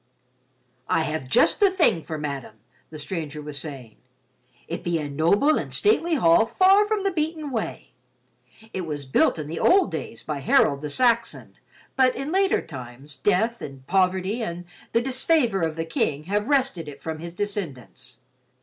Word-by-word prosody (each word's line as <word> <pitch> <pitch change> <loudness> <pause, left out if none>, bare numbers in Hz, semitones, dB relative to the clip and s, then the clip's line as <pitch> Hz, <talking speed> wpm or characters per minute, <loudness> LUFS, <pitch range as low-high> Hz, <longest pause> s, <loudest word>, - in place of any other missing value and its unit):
"I 160 - +2
have 155 -4 -4
just - - +4
the 405 -2 +6
thing 330 - +2
for 160 0 -6
madame," 140 -7 -5 0.3
the 155 - -9
stranger 155 -1 -5
was 150 -1 -7
saying. 130 -6 -9 0.7
"It 170 - -5
be 170 -1 0
a 150 -2 -3
noble 170 - +2
and - - -6
stately 345 -5 +2
hall 195 - +4
far 390 - +4
from 425 -2 -1
the 395 - +1
beaten 310 -3 -3
way. 225 -4 -4 0.8
It 185 -3 -4
was 145 -2 -5
built 130 - +2
in 155 - -4
the 160 +3 -5
old 385 +1 +4
days - - -6
by 150 -2 -4
Harold 140 +1 +3
the 150 - -4
Saxon, 235 - 0 0.4
but 260 -1 +3
in 275 +4 -4
later 385 +1 +2
times, 135 0 -10
death 225 +4 +1
and 135 -2 -9
poverty 190 - +1
and 175 -4 -5 0.3
the 230 - +2
disfavor 260 - +1
of 160 -1 -1
the 165 0 -3
King 150 -2 -1
have 205 +5 -1
wrested 265 - +1
it 140 - -11
from 160 -1 -4
his 170 +1 -8
descendants. 135 - -6
170 Hz, 170 wpm, -24 LUFS, -, 0.8 s, the